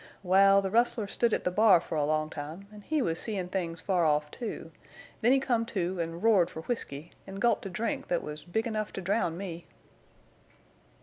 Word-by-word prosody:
Wal, 195 Hz, +2 st, +5 dB
the 190 Hz, -, -2 dB
rustler 230 Hz, -1 st, +2 dB
stood 230 Hz, +3 st, 0 dB
at -, -, 0 dB
the 180 Hz, -, 0 dB
bar 205 Hz, -2 st, +6 dB
fer 165 Hz, -, -6 dB
a 150 Hz, -, +1 dB
long 155 Hz, +1 st, 0 dB
time, 155 Hz, +7 st, -7 dB
en' 210 Hz, -, -11 dB
he 300 Hz, +5 st, 0 dB
was 165 Hz, -4 st, -1 dB
seein' 195 Hz, -5 st, -2 dB
things 170 Hz, -3 st, -3 dB
far 180 Hz, -3 st, +1 dB
off, 150 Hz, -1 st, +1 dB
too; 235 Hz, -3 st, -6 dB, 0.5 s
then 240 Hz, +2 st, +4 dB
he 270 Hz, -, +5 dB
come 245 Hz, -4 st, +1 dB
to 180 Hz, -3 st, -2 dB
an' 165 Hz, +1 st, -5 dB
roared 205 Hz, -6 st, +4 dB
fer 160 Hz, -, -7 dB
whisky, 160 Hz, -, -5 dB, 0.2 s
an' 195 Hz, -, -8 dB
gulped 210 Hz, 0 st, +1 dB
a -, -, -5 dB
drink 230 Hz, +9 st, -3 dB
thet 175 Hz, -, 0 dB
was 150 Hz, 0 st, -7 dB
big 220 Hz, +6 st, -2 dB
enough 215 Hz, -2 st, -2 dB
to -, -, -5 dB
drown 185 Hz, -3 st, 0 dB
me." 175 Hz, -4 st, -7 dB
190 Hz, 205 wpm, -29 LUFS, 165-220 Hz, 0.5 s, bar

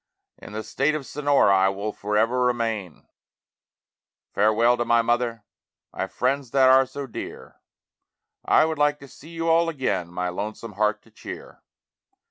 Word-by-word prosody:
In -, -, -11 dB
the 110 Hz, +1 st, -4 dB
State 145 Hz, +6 st, 0 dB
of 150 Hz, -3 st, -5 dB
Sonora 140 Hz, -9 st, +3 dB
I 95 Hz, 0 st, +4 dB
will 100 Hz, +2 st, -4 dB
forever 110 Hz, +5 st, 0 dB
remain. 115 Hz, -8 st, -2 dB, 1.3 s
Farewell 110 Hz, +4 st, +3 dB
to 120 Hz, -, 0 dB
my 120 Hz, 0 st, +3 dB
mother, 120 Hz, -1 st, -1 dB, 0.5 s
my -, -, -3 dB
friends 135 Hz, +1 st, -1 dB
that 130 Hz, +1 st, +4 dB
are 130 Hz, 0 st, +5 dB
so 140 Hz, +2 st, -6 dB
dear, 110 Hz, -, -9 dB, 0.9 s
I -, -, +4 dB
would 160 Hz, -1 st, -3 dB
like 150 Hz, 0 st, +2 dB
to 140 Hz, -, -11 dB
see 145 Hz, +4 st, -15 dB
you 165 Hz, 0 st, -4 dB
all 165 Hz, +1 st, +3 dB
again, 130 Hz, -, -2 dB
my 90 Hz, 0 st, -2 dB
lonesome 105 Hz, +4 st, -6 dB
heart 105 Hz, +1 st, 0 dB
to 115 Hz, -, -23 dB
cheer. -, -, -10 dB
120 Hz, 155 wpm, -24 LUFS, 105-140 Hz, 1.3 s, are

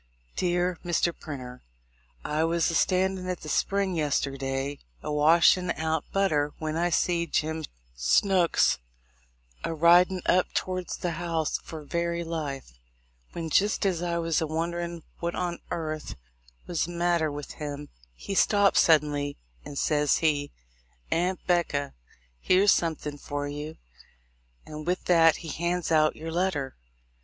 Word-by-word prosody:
Dear 175 Hz, -1 st, 0 dB
Mr. 175 Hz, 0 st, +1 dB
Printer: 125 Hz, -4 st, -8 dB, 0.6 s
I 155 Hz, +1 st, 0 dB
was 165 Hz, +1 st, +1 dB
a -, -, -4 dB
standin' 185 Hz, +2 st, +1 dB
at 180 Hz, -1 st, -3 dB
the 155 Hz, -, -7 dB
spring 195 Hz, +1 st, +1 dB
yesterday 140 Hz, -2 st, -1 dB, 0.2 s
a -, -, -3 dB
wash 160 Hz, +5 st, +5 dB
in' 180 Hz, -1 st, -4 dB
out 160 Hz, -1 st, -1 dB
butter 150 Hz, -7 st, +1 dB
when 155 Hz, 0 st, -3 dB
I 175 Hz, +2 st, +1 dB
seed 170 Hz, -1 st, 0 dB
Jim 160 Hz, 0 st, 0 dB, 0.3 s
Snooks 175 Hz, -, +3 dB, 0.8 s
a 165 Hz, -, -2 dB
ridin' 175 Hz, +3 st, +5 dB
up 180 Hz, 0 st, +2 dB
towards 185 Hz, -1 st, -2 dB
the 175 Hz, -, -2 dB
house 165 Hz, -3 st, -1 dB
for 160 Hz, -2 st, -9 dB
very 170 Hz, +3 st, -2 dB
life, 140 Hz, -, -5 dB, 0.5 s
when, 165 Hz, -2 st, -5 dB
jist 205 Hz, +4 st, +2 dB
as 180 Hz, -4 st, +1 dB
I 170 Hz, -1 st, -1 dB
was 165 Hz, -1 st, 0 dB
a 160 Hz, -, 0 dB
wonderin' 170 Hz, +1 st, -3 dB, 0.2 s
what 170 Hz, 0 st, -2 dB
on 175 Hz, -1 st, -2 dB
airth 155 Hz, -2 st, -4 dB, 0.5 s
was 170 Hz, -2 st, -1 dB
the 175 Hz, -, -7 dB
matter 170 Hz, -2 st, +1 dB
with 145 Hz, -1 st, -7 dB
him, 145 Hz, -1 st, -6 dB, 0.3 s
he 200 Hz, -, -6 dB
stops 200 Hz, 0 st, +4 dB
suddenly, 145 Hz, -3 st, +3 dB, 0.3 s
and 140 Hz, -, -8 dB
ses 150 Hz, -1 st, +2 dB
he, 145 Hz, -3 st, +1 dB, 0.6 s
"Aunt 180 Hz, +3 st, 0 dB
'Becca, 170 Hz, -6 st, 0 dB, 0.5 s
here's 190 Hz, -, +4 dB
somethin' 150 Hz, -3 st, -1 dB
for 145 Hz, 0 st, -4 dB
you;" 150 Hz, +2 st, -6 dB, 0.9 s
and 155 Hz, +1 st, -8 dB
with 180 Hz, +1 st, -1 dB
that 165 Hz, -2 st, +5 dB
he -, -, -5 dB
hands 170 Hz, +2 st, -2 dB
out 155 Hz, -1 st, +4 dB
your 160 Hz, +1 st, -6 dB
letter. 160 Hz, -6 st, -1 dB
165 Hz, 145 wpm, -27 LUFS, 150-175 Hz, 0.9 s, wash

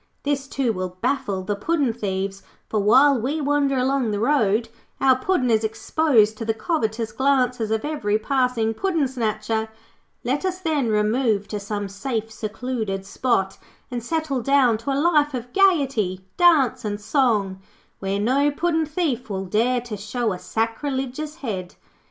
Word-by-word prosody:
This, 280 Hz, -1 st, -1 dB
too, 265 Hz, -4 st, 0 dB
will 185 Hz, -1 st, -5 dB
baffle 205 Hz, -7 st, -1 dB
the 205 Hz, +2 st, -2 dB
puddin' 280 Hz, +2 st, 0 dB
thieves, 195 Hz, -3 st, -3 dB, 0.3 s
for 215 Hz, -, 0 dB
while 260 Hz, +5 st, +5 dB
we 285 Hz, +7 st, -1 dB
wander 285 Hz, -2 st, +1 dB
along 260 Hz, -1 st, +1 dB
the 205 Hz, -1 st, -1 dB
road, 225 Hz, -3 st, +2 dB, 0.3 s
our 265 Hz, -1 st, +5 dB
Puddin' 255 Hz, -2 st, 0 dB
is 220 Hz, 0 st, +3 dB
exposed 220 Hz, -1 st, +2 dB
to -, -, -3 dB
the 225 Hz, 0 st, -1 dB
covetous 225 Hz, -4 st, -1 dB
glances 250 Hz, -2 st, +1 dB
of 220 Hz, +2 st, -1 dB
every 225 Hz, -9 st, 0 dB
passing 250 Hz, -2 st, 0 dB
puddin' 330 Hz, -, 0 dB
snatcher. 220 Hz, -3 st, -2 dB, 0.5 s
Let 265 Hz, +6 st, -1 dB
us, 370 Hz, -1 st, -1 dB
then, 310 Hz, -8 st, 0 dB
remove 215 Hz, 0 st, +1 dB
to 210 Hz, -, -3 dB
some 205 Hz, 0 st, -4 dB
safe, 225 Hz, +2 st, -4 dB
secluded 220 Hz, -2 st, -4 dB
spot 195 Hz, -3 st, 0 dB, 0.3 s
and 240 Hz, -2 st, -4 dB
settle 310 Hz, -2 st, -1 dB
down 255 Hz, -4 st, +3 dB
to 230 Hz, +5 st, -3 dB
a 270 Hz, -, 0 dB
life 295 Hz, -3 st, +3 dB
of 245 Hz, 0 st, -6 dB
gaiety, 270 Hz, -, +2 dB
dance, 285 Hz, -8 st, +4 dB
and 205 Hz, -1 st, -3 dB
song, 210 Hz, -6 st, +1 dB, 0.4 s
where 195 Hz, +1 st, -2 dB
no 265 Hz, +7 st, +2 dB
puddin' 320 Hz, +1 st, 0 dB
thief 295 Hz, -7 st, -2 dB
will 195 Hz, -1 st, -3 dB
dare 240 Hz, +6 st, +1 dB
to 235 Hz, -3 st, -6 dB
show 215 Hz, +2 st, -2 dB
a 180 Hz, -, -6 dB
sacrilegious 265 Hz, +7 st, -3 dB
head. 185 Hz, -6 st, -4 dB
240 Hz, 155 wpm, -23 LUFS, 215-280 Hz, 0.5 s, while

